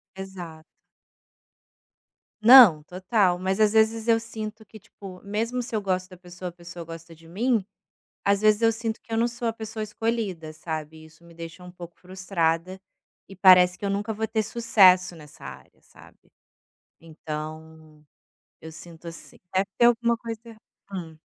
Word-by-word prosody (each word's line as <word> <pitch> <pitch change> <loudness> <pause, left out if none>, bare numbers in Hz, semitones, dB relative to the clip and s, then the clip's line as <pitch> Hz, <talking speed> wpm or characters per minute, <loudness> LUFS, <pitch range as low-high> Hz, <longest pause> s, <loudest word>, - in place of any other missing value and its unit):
Exato. 180 -5 -9 1.8
Não, 225 -9 +9
total, 185 +2 0
mas 190 +2 -2
às 215 -1 +4
vezes 220 +1 +2
eu 230 -1 +5
sinto 220 -1 -7
que 215 +1 -14
tipo, 190 -2 -13
mesmo 225 +5 -2
se 240 -1 -6
eu 215 - 0
gosto 185 -2 -2
da 185 - -12
pessoa, 180 0 -9
a - - -5
pessoa 175 -1 -10
gosta 165 0 -10
de 165 0 -18
mim, 220 +4 0 0.6
às 200 0 +2
vezes 215 0 +3
eu 225 0 +4
sinto 225 0 -4
que - - -18
eu 225 - 0
não 235 - +2
sou 240 0 -4
a 225 - -1
pessoa 220 0 -7
escolhida, 210 -7 -3
sabe, 155 0 -7
isso 160 +2 -20
me 170 0 -17
deixa 165 +2 -10
um 180 - -11
pouco 175 -1 -12
frustrada, 185 0 -2 0.5
e 195 - -12
parece 180 -1 +6
que - - -5
eu - - -1
nunca 205 +3 -2
vou 220 +1 -3
ter 220 0 -1
sucesso 190 -6 +4
nessa 150 -3 -15
área, - - -12
sabe. - - -20 0.7
Então, 155 -1 -9 0.6
eu 160 - -9
sinto 165 +1 -12
assim 165 - -11 0.2
deve 190 +1 +1
ter 235 - +5
alguma 235 0 +2
coisa 230 -1 -7
erra 230 -1 -13 0.4
hum. 165 -4 -7
190 Hz, 170 wpm, -25 LUFS, 170-220 Hz, 1.8 s, Não